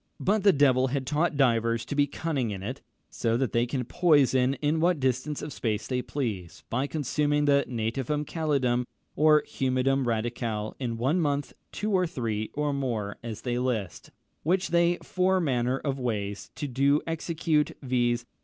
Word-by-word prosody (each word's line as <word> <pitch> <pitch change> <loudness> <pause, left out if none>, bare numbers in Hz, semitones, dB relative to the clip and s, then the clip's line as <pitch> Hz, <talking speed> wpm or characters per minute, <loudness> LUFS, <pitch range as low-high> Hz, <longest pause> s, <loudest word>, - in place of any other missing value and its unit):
But 210 +2 +1
the 200 - +6
devil 135 -4 +4
had 135 0 -2
taught 150 +3 0
divers 115 -3 +2
to - - -5
be 145 0 +3
cunning 145 -4 -2
in 95 -2 -5
it, 125 +7 -5 0.3
so 115 -1 0
that 130 -1 0
they 120 +1 +1
can 130 0 -2
poison 135 -4 +3
in 150 +3 0
what 170 -1 +2
distance 130 +3 -1
of 150 - -5
space 110 -2 -2
they 125 -1 -1
please, 105 - -4
by 130 +4 0
consuming 145 0 0
the 140 -1 +4
nativum 130 +5 -2
calidum, 135 -7 0 0.3
or 150 0 +5
humidum 130 +1 0
radicale, 115 -2 -2
in 120 -3 -3
one 135 +10 +1
month, 145 -2 -1 0.2
two 215 +2 -3
or 185 -2 +2
three, 110 -7 -3
or 150 -1 0
more, 115 -7 -2
as 115 -2 -6
they 120 -1 -1
list, 115 -8 -3 0.3
which 185 +4 +1
they 170 0 +3
four 185 0 +1
manner 130 -5 +1
of 135 -1 -3
ways 105 -5 -3
do 140 +1 +1
execute, 165 -1 0
viz. 120 -2 +1
135 Hz, 165 wpm, -27 LUFS, 120-150 Hz, 0.3 s, the